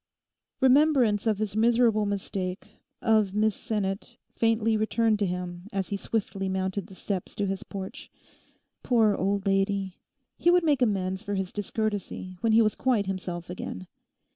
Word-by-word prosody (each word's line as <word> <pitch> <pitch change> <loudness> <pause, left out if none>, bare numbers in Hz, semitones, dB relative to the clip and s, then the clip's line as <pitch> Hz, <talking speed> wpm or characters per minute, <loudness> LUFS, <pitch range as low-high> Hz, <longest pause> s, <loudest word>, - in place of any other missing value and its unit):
Remembrance 260 -6 +4
of 215 -2 +2
his 210 -1 -3
miserable 225 -1 +3
mistake, 195 -2 -4 0.2
of 215 -3 +3
Miss 215 -1 +2
Sinnet, 195 -2 -3 0.2
faintly 225 -1 +2
returned 220 0 +1
to 200 - +1
him 180 0 -5
as 195 -1 -2
he 200 - -1
swiftly 195 -2 -2
mounted 190 0 -2
the 190 - -13
steps 190 -1 -4
to 205 - -1
his 195 0 -2
porch. 195 -2 -7 0.7
Poor 225 -4 +3
old 200 +1 -1
lady. 195 -1 0 0.4
He 345 - +3
would 355 0 +5
make 290 -5 +2
amends 190 -5 0
for 205 - -3
his 190 -1 -2
discourtesy 205 -3 -3
when 225 -1 +2
he 225 +1 +6
was 215 - +2
quite 240 -6 +1
himself 180 -2 -4
again. 135 - -6
205 Hz, 155 wpm, -27 LUFS, 190-220 Hz, 0.7 s, he